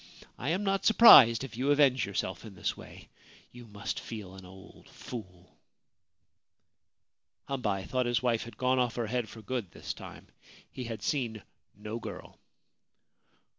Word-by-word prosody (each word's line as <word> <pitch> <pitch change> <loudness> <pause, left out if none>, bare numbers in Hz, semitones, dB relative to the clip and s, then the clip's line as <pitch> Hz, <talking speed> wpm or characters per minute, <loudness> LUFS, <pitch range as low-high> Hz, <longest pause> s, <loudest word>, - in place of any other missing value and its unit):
I 135 - -3
am 185 +5 0
not 195 -1 0
surprised 135 - +8
if 130 -3 -8
you 130 +4 -1
avenge 140 -4 +3
yourself 95 -2 -4
in 110 -4 -11
this - - -2
way - - -13 0.2
— - - -25
you 120 -1 -13
must 105 -1 -5
feel 105 -5 -8
an 95 -1 -12
old 95 +1 -15
fool! 90 -7 -10 1.3
' - - -54
Hambei 105 -8 -2
thought 125 -1 -1
his 120 0 0
wife 120 -3 +1
had 120 - -12
gone 130 0 +1
off 120 -2 0
her 120 - -2
head 120 0 -2
for 110 - -12
good 115 -3 -4
this - - -6
time. - - -12 0.4
He 125 - -7
had 115 -1 -6
seen 115 -7 -2 0.3
no 105 +3 -6
girl. - - -9
115 Hz, 165 wpm, -30 LUFS, 105-130 Hz, 1.3 s, surprised